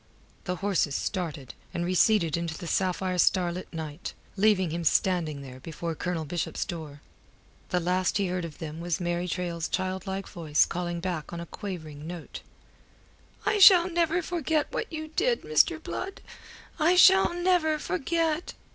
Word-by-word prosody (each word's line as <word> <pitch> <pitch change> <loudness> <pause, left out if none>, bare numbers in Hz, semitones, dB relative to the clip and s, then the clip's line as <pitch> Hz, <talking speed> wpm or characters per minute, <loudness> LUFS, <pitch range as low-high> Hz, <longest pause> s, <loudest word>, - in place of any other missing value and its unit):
The 180 - -1
horses 180 -6 0
started, 160 -9 -3 0.2
and 170 - -1
receded 180 -2 +3
into 170 -1 -3
the - - -8
sapphire 185 +1 0
starlit 180 0 +1
night, 160 -1 -6 0.2
leaving 195 -4 +3
him 170 +1 -3
standing 160 -4 +1
there 130 -1 -10
before 165 +3 -5
Colonel 165 0 -3
Bishop's 170 +3 -3
door. 155 -5 -7 0.7
The 180 - +1
last 180 +2 +1
he 200 - +1
heard 180 -1 -2
of 160 -3 -7
them 160 0 -6
was 170 +1 -2
Mary 175 0 -1
Traill's 170 -2 -2
childlike 190 +1 -3
voice 155 -3 +2
calling 175 -1 -3
back 175 -4 -3
on 170 - -5
a 170 - -5
quavering 155 -6 -7
note 175 -1 -7 1.0
"I 415 0 +2
shall 370 -2 +8
never 340 +1 +1
forget 320 -3 -1
what 440 - -3
you 315 -1 -5
did, 470 +9 0
Mr. 460 - +3
Blood. 390 +1 -6 0.6
I 335 +4 +4
shall 375 -1 +6
never 350 -3 +2
forget." 330 0 -1
180 Hz, 155 wpm, -27 LUFS, -, 1.0 s, shall